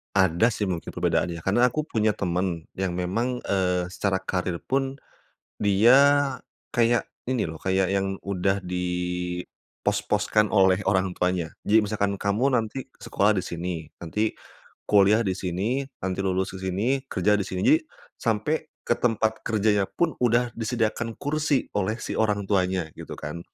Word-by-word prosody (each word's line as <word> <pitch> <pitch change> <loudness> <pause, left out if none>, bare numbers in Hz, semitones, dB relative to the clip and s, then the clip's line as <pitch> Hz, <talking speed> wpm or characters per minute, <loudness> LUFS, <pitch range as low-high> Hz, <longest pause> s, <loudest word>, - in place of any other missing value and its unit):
Ada 95 +4 +4
sih 105 -2 -2
mungkin 90 -3 -3
perbedaannya 85 -1 0
karena 110 +9 +3
aku 155 +4 -2
punya 110 -5 +1
temen 90 -4 -2
yang 95 -1 -1
memang, 115 +8 -1
eee, 90 -2 +1
secara 95 +2 -1
karir 90 -2 -2
pun 135 +4 -2 0.6
dia 105 +4 +5 0.8
kayak 120 0 +3 0.2
ini 130 -3 +1
loh, 80 -1 -7
kayak 95 0 +1
yang 95 0 0
udah 95 0 0
di 90 0 -2 1.0
pos-poskan 105 0 +1
oleh 95 -2 +4
orang 95 -1 +1
tuanya 90 -3 -1
jadi 110 +1 +4
misalkan 100 -1 -1
kamu 105 +8 +1
nanti 115 +4 -2 0.2
sekolah 105 +1 +1
di 95 - -1
sini, 85 -1 -4 0.2
nanti 105 +6 -1 0.6
kuliah 105 +2 +5
di 95 -5 0
sini, 100 +10 -1 0.2
nanti 95 0 -2
lulus 95 0 -1
di - - -9
sini, 95 +5 -1 0.2
kerja 105 +3 +2
di 100 - -2
sini, 95 +9 +3 0.4
sampai 115 +6 0 0.3
ke 120 - +2
tempat 110 -2 0
kerjanya 105 -2 +2
pun 165 - -1
udah 120 0 +2
disediakan 115 0 -1
kursi 145 -1 0
oleh 105 +2 0
si - - -4
orang 105 -2 +1
tuanya 95 -4 +1
gitu - - -8
kan. 85 - -6
100 Hz, 150 wpm, -25 LUFS, 95-115 Hz, 1.0 s, dia